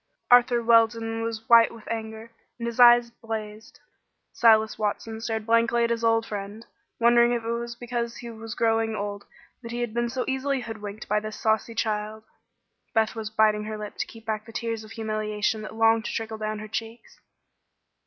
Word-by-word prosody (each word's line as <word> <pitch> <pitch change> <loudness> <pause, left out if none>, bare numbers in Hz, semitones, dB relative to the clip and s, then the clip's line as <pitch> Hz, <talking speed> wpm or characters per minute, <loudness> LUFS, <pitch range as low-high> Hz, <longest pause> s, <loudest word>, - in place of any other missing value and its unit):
Arthur 245 -1 +5
Weldon 225 0 +3
was 225 -1 -4
white 230 -1 +7
with 225 -2 -13
anger, 220 0 -6 0.3
and 235 - -5
his 235 +1 -4
eyes 240 -1 +7
blazed. 220 -2 -7 0.5
Silas 220 -2 +4
Watson 220 +1 -3
stared 220 -1 -3
blankly 230 +1 +3
at 235 - +1
his 230 0 -1
old 225 0 +3
friend, 205 +1 -7 0.3
wondering 235 0 +5
if 235 -1 -2
it 230 - -2
was 235 0 -4
because 235 -1 -4
he 235 -1 -8
was 225 0 -8
growing 225 -1 +1
old 205 0 -5 0.4
that 230 -2 -8
he 240 +1 -3
had 240 -3 -3
been 240 0 0
so 255 +1 -3
easily 265 0 -1
hoodwinked 215 -2 -7
by 210 +1 +2
this 215 0 -7
saucy 220 +1 0
child. 215 -1 -2 0.7
Beth 220 -1 +2
was 220 -2 -5
biting 215 -1 +2
her 215 0 -5
lip 210 -1 -7
to - - -2
keep 225 -1 -14
back 215 0 -3
the - - -10
tears 230 -1 -3
of 215 - -13
humiliation 215 -1 -2
that 215 0 -8
longed 225 0 +3
to - - -3
trickle 220 -1 -4
down 215 0 -3
her 215 +1 -7
cheeks. 225 +2 -7
225 Hz, 190 wpm, -26 LUFS, 215-235 Hz, 0.7 s, white